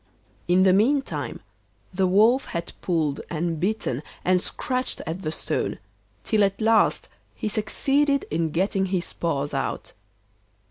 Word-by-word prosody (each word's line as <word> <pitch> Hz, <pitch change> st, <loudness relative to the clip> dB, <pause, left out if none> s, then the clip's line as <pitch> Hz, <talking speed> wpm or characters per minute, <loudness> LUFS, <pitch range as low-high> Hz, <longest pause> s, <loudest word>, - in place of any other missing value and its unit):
In 180 Hz, +2 st, +4 dB
the 190 Hz, -1 st, +5 dB
meantime 270 Hz, +8 st, +1 dB, 0.5 s
the 190 Hz, 0 st, +2 dB
Wolf 220 Hz, +8 st, +4 dB
had 170 Hz, -1 st, -4 dB
pulled 155 Hz, -5 st, 0 dB
and 165 Hz, -1 st, -2 dB
bitten 180 Hz, -, -1 dB, 0.2 s
and 180 Hz, 0 st, +3 dB
scratched 255 Hz, 0 st, -2 dB
at 165 Hz, +4 st, -4 dB
the 155 Hz, -4 st, -2 dB
stone, -, -, -2 dB, 0.5 s
till 210 Hz, -, +2 dB
at 195 Hz, 0 st, +1 dB
last 225 Hz, 0 st, +3 dB, 0.3 s
he -, -, -3 dB
succeeded 275 Hz, +7 st, +1 dB
in 160 Hz, +1 st, 0 dB
getting 190 Hz, +4 st, 0 dB
his 180 Hz, -2 st, -2 dB
paws 145 Hz, -4 st, -2 dB
out. -, -, -3 dB
190 Hz, 135 wpm, -25 LUFS, 170-220 Hz, 0.5 s, the